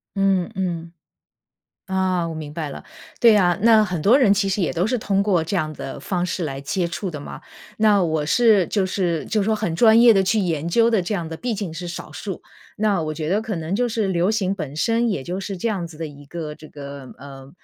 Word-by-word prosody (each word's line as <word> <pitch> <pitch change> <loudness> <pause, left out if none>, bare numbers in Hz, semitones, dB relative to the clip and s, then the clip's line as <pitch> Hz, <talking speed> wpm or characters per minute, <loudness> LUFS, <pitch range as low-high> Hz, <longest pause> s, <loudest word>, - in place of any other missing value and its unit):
嗯 195 -2 +1
嗯。 170 -3 -3 1.0
啊， 185 -2 0
我 165 - -5
明 155 -2 -7
白 155 -1 -4
了。 - - -8 0.4
对 230 -3 +7
啊， 175 -4 +3
那 220 -1 +6
很 180 -5 -3
多 235 - +5
人 220 -8 +5
其 200 0 0
实 195 +1 -1
也 175 - 0
都 175 +1 0
是 250 +1 0
通 200 -2 +1
过 185 -5 +1
这 170 - -4
样 155 -4 -1
的 140 - -7
方 180 -2 -2
式 180 0 -3
来 135 -4 -4
接 170 +5 -1
触 175 +2 -4
的 150 - -6
嘛， - - -9 0.3
那 210 -3 +4
我 160 -3 0
是 215 0 +4
就 200 -3 0
是 180 -4 -1
就 215 - 0
是 - - 0
说 220 +2 +1
很 210 -6 -2
专 225 +3 +6
业 235 -1 +8
地 195 -2 +3
去 210 +3 +2
研 165 -5 -1
究 230 +7 +3
的 220 -4 +3
这 185 +4 -3
样 170 -4 -3
的 160 - -6
毕 240 +6 -3
竟 200 -5 -4
是 170 +2 -6
少 170 -2 -7
数。 180 +3 -6 0.4
那 205 -3 +2
我 155 0 -3
觉 155 -1 -4
得 200 +3 +2
可 220 -1 -4
能 165 +3 -3
就 245 +2 +1
是 220 -3 -1
流 180 +1 +1
行 195 -4 0
本 155 -7 -6
身 230 +8 +1
也 195 -11 -2
就 175 +7 -4
是 195 0 -5
这 180 - -4
样 195 -6 -2
子 165 -2 -13
的 165 +1 -4
一 145 -1 -14
个 155 0 -6
这 155 - -13
个 140 -2 -9
呃， 135 -1 -11
185 Hz, 265 characters per minute, -22 LUFS, 160-210 Hz, 1.0 s, 业